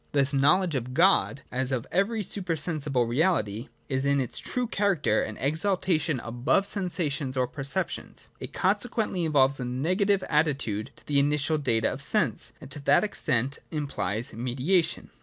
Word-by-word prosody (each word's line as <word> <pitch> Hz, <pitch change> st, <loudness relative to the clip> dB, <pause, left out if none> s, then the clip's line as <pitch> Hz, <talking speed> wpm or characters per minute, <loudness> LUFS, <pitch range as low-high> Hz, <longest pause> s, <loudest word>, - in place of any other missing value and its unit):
Thus 140 Hz, -1 st, +3 dB
the 140 Hz, -, 0 dB
knowledge 170 Hz, +5 st, +3 dB
of 125 Hz, -1 st, -3 dB
God, 165 Hz, -5 st, +3 dB
as 130 Hz, +1 st, -1 dB
of 125 Hz, -3 st, -1 dB
every 205 Hz, +4 st, +1 dB
supersensible 155 Hz, -, -1 dB
reality, 120 Hz, -, 0 dB, 0.2 s
is 130 Hz, -1 st, -1 dB
in 140 Hz, 0 st, +2 dB
its 125 Hz, -3 st, -2 dB
true 250 Hz, -1 st, -2 dB
character 195 Hz, -, +1 dB
an 105 Hz, -, -5 dB
exaltation 160 Hz, -1 st, 0 dB
above 120 Hz, +11 st, +1 dB
sensations 165 Hz, -9 st, -2 dB
or 130 Hz, -, +2 dB
perceptions: 135 Hz, +1 st, -2 dB
it -, -, -7 dB
consequently 205 Hz, -2 st, 0 dB
involves 140 Hz, -3 st, +3 dB
a -, -, -3 dB
negative 185 Hz, -, +1 dB
attitude 140 Hz, -9 st, 0 dB
to -, -, -21 dB
the 145 Hz, -1 st, +2 dB
initial 150 Hz, +2 st, +1 dB
data 115 Hz, -6 st, +1 dB
of -, -, -7 dB
sense, -, -, 0 dB
and -, -, -12 dB
to 145 Hz, -, -1 dB
that 140 Hz, -, +3 dB
extent 135 Hz, -, -1 dB
implies 120 Hz, -, -3 dB
mediation. 130 Hz, -, 0 dB
145 Hz, 155 wpm, -27 LUFS, 130-180 Hz, 0.2 s, Thus